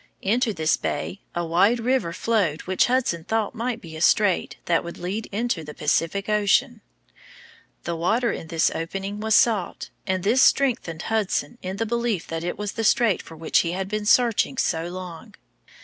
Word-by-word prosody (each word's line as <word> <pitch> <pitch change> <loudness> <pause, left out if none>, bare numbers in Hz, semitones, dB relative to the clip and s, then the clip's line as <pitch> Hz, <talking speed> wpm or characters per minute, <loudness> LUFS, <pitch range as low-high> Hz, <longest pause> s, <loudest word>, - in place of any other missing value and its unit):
Into 230 +4 +2
this 160 -5 +1
bay 195 - -4
a 175 0 -1
wide 190 +8 +3
river 245 -6 0
flowed 185 -4 0
which 185 0 +2
Hudson 245 -10 0
thought 220 +2 -1
might 240 0 -3
be 165 -7 -11
a 155 - -7
strait 200 +1 +3
that 170 -1 +2
would 170 - -8
lead 195 +5 -4
into 215 -5 -2
the 150 0 -9
Pacific 165 +6 0
Ocean. 215 +3 +2 1.0
The 170 - -3
water 220 +9 +1
in 160 - -6
this 160 -1 +1
opening 195 +5 -4
was 220 0 +2
salt, 215 -7 +1 0.2
and 185 -2 -1
this 235 +6 +3
strengthened 235 -15 +2
Hudson 225 +2 -1
in 185 +1 -5
the 225 - -1
belief 235 -5 -1
that 165 0 -3
it 175 - -3
was 210 -1 -3
the 225 - -4
strait 220 -2 +3
for 165 - -13
which 160 0 +2
he 170 0 0
had 190 +1 -3
been 210 +1 -3
searching 245 +2 +3
so 165 -8 0
long. 180 -2 -8
200 Hz, 180 wpm, -24 LUFS, 170-225 Hz, 1.0 s, wide